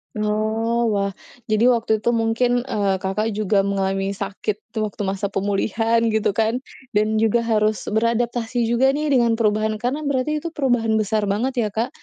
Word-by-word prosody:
Oh, 220 +2 0
wah. 200 0 0 0.4
Jadi 215 +2 +3
waktu 230 -3 +3
itu 235 +3 0
mungkin, 235 +2 +1
eee, 200 -2 +1
Kakak 210 +3 -1
juga 205 -1 +1
mengalami 195 0 -1
sakit 200 +2 -4
tuh 220 -1 -2
waktu 210 0 -6
masa 195 0 -2
pemulihan 210 +4 0
gitu 220 -1 +1
kan, 225 +3 +1 0.3
dan 215 +1 +2
juga 225 +1 +2
harus 215 -3 0
beradaptasi 235 +1 0
juga 265 +3 +3
nih 300 +1 -1
dengan 240 -4 +3
perubahan 215 -1 +1
karena 280 +5 -2
berarti 280 +2 0
itu 330 +2 -5
perubahan 245 -6 +1
besar 215 0 0
banget 235 +4 0
ya, - - -2
Kak? 230 +3 -1
220 Hz, 165 wpm, -21 LUFS, 210-235 Hz, 0.4 s, Jadi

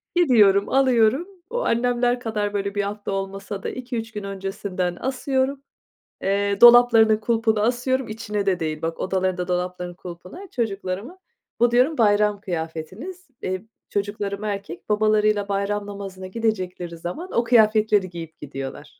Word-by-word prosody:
Gidiyorum, 210 - +5
alıyorum 260 - +3 0.2
o, - - -2
annemler 245 +1 +1
kadar, 210 -3 -2
böyle, 200 0 -2
1 205 - +1
hafta 205 0 -4
olmasa 195 +1 -4
da, - - -2
2-3 240 -3 -5
gün 210 -1 -6
öncesinden 195 -2 -3
asıyorum, 265 +1 -1 0.6
eee, 200 +1 0
dolaplarının 235 -2 +8
kulpuna 220 -1 +1
asıyorum, 250 +2 0
içine 210 -2 -3
de 185 -3 +1
değil 155 -1 -3
bak, 165 0 -3
odalarında 185 -1 -1
dolaplarının 180 0 -3
kulpuna 180 - -10
çocuklarımın, 205 - -3 0.4
bu 240 0 +4
diyorum, 255 +6 +3
"Bayram 210 -2 +3
kıyafetiniz." 185 - -6 0.2
iii, 185 +3 -3 0.2
çocuklarım 205 0 -3
erkek, 200 -3 -5
babalarıyla 215 -1 +2
bayram 200 +1 -1
namazına 195 -2 -7
gidecekleri 185 -5 -3
zaman, 180 - -6
o 235 - +2
kıyafetleri 215 -4 +4
giyip 165 -2 -9
gidiyorlar. 135 0 -6
205 Hz, 135 wpm, -23 LUFS, 185-235 Hz, 0.6 s, dolaplarının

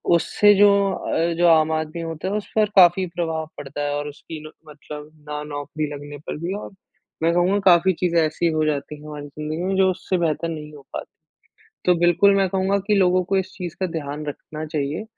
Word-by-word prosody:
उससे 205 +4 +4
जो 205 +1 +7 0.2
अ, 170 +1 -1
जो 175 0 +4
आम 160 -1 +5
आदमी 155 +1 -2
होता 165 +1 -5
है 195 - -1
उस 210 - -6
पर 215 -1 +4
काफ़ी 185 0 +6
प्रभाव 160 -2 -2
पड़ता 145 0 -6
है 145 0 -1
और 145 0 -3
उसकी 150 +2 -9
न - - -12 0.2
मतलब 150 0 -10 0.2
ना 150 0 -3
नौकरी 145 +1 -4
लगने 145 0 -8
पर - - -4
भी 180 +3 -2
और - - -9 0.5
मैं 165 +1 +3
कहूँगा 180 +4 +2
काफ़ी 185 0 +6
चीज़ें 170 0 +1
ऐसी 160 +2 0
हो 155 -1 +1
जाती 150 -1 -2
हैं, 150 - -11
हमारी 150 -1 -7
ज़िंदगी 155 +3 -5
में 190 +1 0
जो 190 -1 +4
उससे 185 +1 -2
बेहतर 165 -1 0
नहीं 155 -2 -7
हो 145 - -12
पाती। - - -4 0.8
तो 180 - +5
बिल्कुल 175 +4 +4
मैं 195 -1 +2
कहूँगा 190 +2 +1
कि 210 - +3
लोगों 185 -2 +3
को 195 +2 0
इस 190 -1 -1
चीज़ 175 -3 -6
का 190 - +1
ध्यान 150 -3 -5
रखना 155 +1 -6
चाहिए 150 +4 -3
165 Hz, 215 wpm, -22 LUFS, 150-185 Hz, 0.8 s, जो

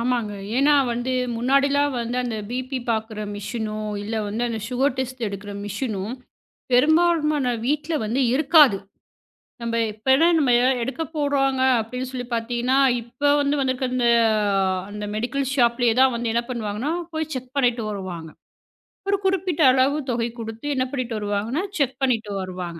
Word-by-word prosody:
ஆமாங்க. 235 -3 -1 0.2
ஏனா 285 +2 +4 0.2
வந்து 245 +2 -2 0.2
முன்னாடிலாம் 275 +3 +2
வந்து 235 +1 -3
அந்த 230 -3 -3
பிபி 255 +2 -3
பாக்குற 220 -1 -2
மெஷினோ 215 +1 -4 0.3
இல்ல 220 +2 -4
வந்து 220 +4 -3
அந்த 225 -1 -3
சுகர் 260 +1 0
டெஸ்ட் 255 -1 -4
எடுக்குற 200 +1 -7
மெஷினும் 205 +1 -3 0.6
பெரும்பாலுமான 305 -1 +3
வீட்டுல 300 +3 -1
வந்து 235 +6 -1
இருக்காது. 290 - +5 0.8
நம்ப 230 0 -2 0.2
எப்பெல்லாம் 265 +10 +3
நம்ம 265 -4 +2
ஏதா 255 +1 +3
எடுக்க 275 +6 -3
போறோங்க 270 -3 +1 0.2
அப்டின்னு 250 +3 -4
சொல்லிப் 245 -1 -6
பாத்தீங்கன்னா, 240 +3 0 0.2
இப்ப 250 +5 0
வந்து 285 +1 +1
வந்துருக்க 260 0 0
அந்த 245 -2 +2 0.8
அந்த 210 0 -6
மெடிக்கல் 255 +4 -1
ஷாப்லயே 235 -2 +3
தான் 265 -1 +5
வந்து 235 -1 -2
என்ன 235 0 +1
பண்ணுவாங்கன்னா, 230 +4 -3 0.2
போய் 315 0 -3
செக் 255 -1 -6
பண்ணிட்டு 245 -3 +2
வருவாங்க. 180 -5 -6 0.8
ஒரு 400 - +3
குறிப்பிட்ட 370 -4 0
அளவு 265 +3 +2
தொகை 235 0 -1
கொடுத்து 225 +3 -7
என்ன 255 0 +1
பண்ணிட்டு 245 -4 -2
வருவாங்கன்னா, 210 - -2 0.2
செக் 265 -2 0
பண்ணிட்டு 225 -5 0
வருவாங்க. 180 -2 -6
250 Hz, 145 wpm, -23 LUFS, 225-275 Hz, 0.8 s, இருக்காது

